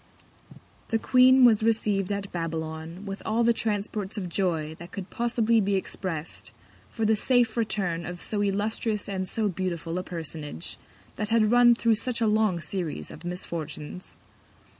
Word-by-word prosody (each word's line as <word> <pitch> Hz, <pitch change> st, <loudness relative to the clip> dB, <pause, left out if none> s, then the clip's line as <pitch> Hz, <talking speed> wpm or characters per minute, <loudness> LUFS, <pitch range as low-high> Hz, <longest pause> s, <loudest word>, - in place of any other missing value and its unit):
The 225 Hz, -, +1 dB
Queen 255 Hz, +2 st, +6 dB
was 220 Hz, -3 st, +5 dB
receiv'd 210 Hz, -3 st, +1 dB
at 200 Hz, -1 st, -3 dB
Babylon 165 Hz, +2 st, -4 dB
with 195 Hz, 0 st, -5 dB
all 225 Hz, +2 st, +1 dB
the 235 Hz, 0 st, +4 dB
Transports 210 Hz, -2 st, -2 dB
of 185 Hz, -3 st, -3 dB
Joy 165 Hz, -4 st, -1 dB
that 170 Hz, +1 st, -10 dB
could 195 Hz, -1 st, -7 dB
possibly 230 Hz, -1 st, +2 dB
be 200 Hz, 0 st, +1 dB
express'd 180 Hz, -4 st, -4 dB, 0.4 s
for 225 Hz, -, -2 dB
the 220 Hz, +1 st, +4 dB
safe 240 Hz, 0 st, +3 dB
Return 195 Hz, -7 st, -1 dB
of 175 Hz, 0 st, -6 dB
so 205 Hz, +2 st, -1 dB
illustrious 210 Hz, +2 st, -1 dB
and 190 Hz, -2 st, -3 dB
so 220 Hz, -2 st, 0 dB
beautiful 175 Hz, -2 st, -3 dB
a -, -, -4 dB
Personage, 160 Hz, -, -5 dB, 0.4 s
that 210 Hz, -1 st, -2 dB
had 225 Hz, -1 st, +3 dB
run 240 Hz, 0 st, +7 dB
thro' 230 Hz, -1 st, +3 dB
such 240 Hz, +3 st, -1 dB
a 230 Hz, -, +2 dB
long 215 Hz, -4 st, +2 dB
Series 160 Hz, -, -4 dB
of 155 Hz, -, -10 dB
Misfortunes. 170 Hz, -1 st, -6 dB
200 Hz, 160 wpm, -27 LUFS, 170-220 Hz, 0.4 s, run